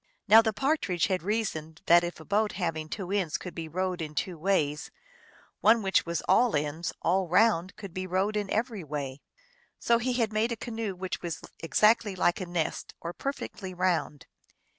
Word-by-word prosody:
Now 220 +3 +9
the 220 -1 0
Partridge 210 - 0
had 185 -2 0
reasoned 180 -5 -3
that 175 0 +6
if 175 -1 -4
a 160 - -11
boat 210 +3 +1
having 160 -4 -3
two 190 0 -5
ends 190 -6 0
could 180 - -8
be 165 -1 -5
rowed 185 +2 -2
in 150 -1 -5
two 180 +4 -2
ways, 155 -4 0 0.7
one 220 +1 +5
which 190 -3 +2
was 170 -1 -2
all 245 -6 +4
ends, 150 +3 -2
all 185 +2 +2
round, 185 -1 +3
could 200 -5 -9
be 185 +1 -4
rowed 190 +4 0
in 205 -2 -1
every 220 -3 -1
way. 145 -2 -5 0.6
So 235 0 +2
he 250 +1 0
had 230 -3 0
made 220 +3 +1
a - - 0
canoe 225 -3 -4
which 185 0 -4
was 170 -3 -5 0.2
exactly 210 +4 +3
like 175 0 +1
a 185 - -4
nest, 175 -2 -3
or 170 +1 -5
perfectly 200 -8 -5
round. 175 -6 0
185 Hz, 185 wpm, -28 LUFS, 165-215 Hz, 0.7 s, Now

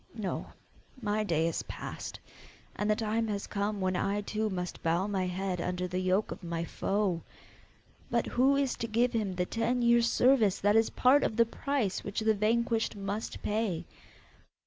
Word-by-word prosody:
No, 210 -4 -3 0.5
my 215 -2 0
day 165 -5 +1
is 165 - -1
past, - - -7 0.6
and 210 - -1
the 215 - +4
time 225 +1 0
has 205 -2 -2
come 205 0 -2
when 185 -1 0
I 200 +3 0
too 215 +1 -2
must 180 -2 -4
bow 170 +3 +1
my 195 -3 -1
head 180 0 -2
under 180 +1 -2
the 180 +1 -2
yoke 185 +3 +1
of - - -6
my 170 -1 -2
foe! 195 -2 -1 0.9
But - - +1
who 265 +3 +3
is 275 -2 +1
to 230 - -3
give 235 +3 +2
him 210 -5 -1
the 180 0 0
ten 240 +4 0
years' 235 0 +4
service 235 -7 +4
that 205 +1 +2
is 225 0 +4
part 270 +3 +4
of - - 0
the 230 0 +5
price 240 -4 -2
which 200 +2 -3
the 220 0 +3
vanquished 225 +2 +1
must 200 +2 -4
pay? 210 -5 -1
210 Hz, 180 wpm, -30 LUFS, 185-230 Hz, 0.9 s, the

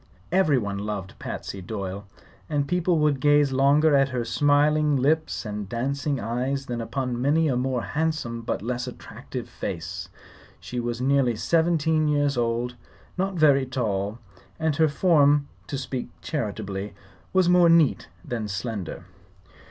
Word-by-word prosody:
Everyone 135 - +2
loved 100 -2 -4
Patsy 100 - -6
Doyle, 100 0 -5 0.4
and 145 -2 0
people 180 0 +1
would 150 -3 +2
gaze 145 0 +4
longer 140 +3 +4
at 135 0 +4
her 125 -2 -2
smiling 145 +4 +3
lips 150 +1 +1
and 105 -2 -5
dancing 135 +4 -1
eyes 125 +5 -2
than 120 -2 -3
upon 125 0 -3
many 155 +4 +3
a 135 - +1
more 125 -1 -1
handsome 150 -7 -2
but 115 - -3
less 125 +2 -2
attractive 125 - -8
face. 85 +1 -5 0.5
She 125 - -5
was 120 0 -3
nearly 135 -3 +2
seventeen 160 +2 +2
years 145 -1 +2
old, 120 +1 -1 0.4
not 190 +1 -1
very 140 -5 +4
tall, 105 -5 -2 0.4
and 160 -2 +1
her 160 -1 +4
form, 145 -3 +4 0.2
to 140 - -3
speak 130 -2 -4
charitably, 105 -7 -4 0.4
was 185 -2 +3
more 175 -1 +6
neat 165 -4 +4 0.2
than 115 -3 -3
slender. 100 -1 -5
135 Hz, 140 wpm, -25 LUFS, 115-150 Hz, 0.5 s, more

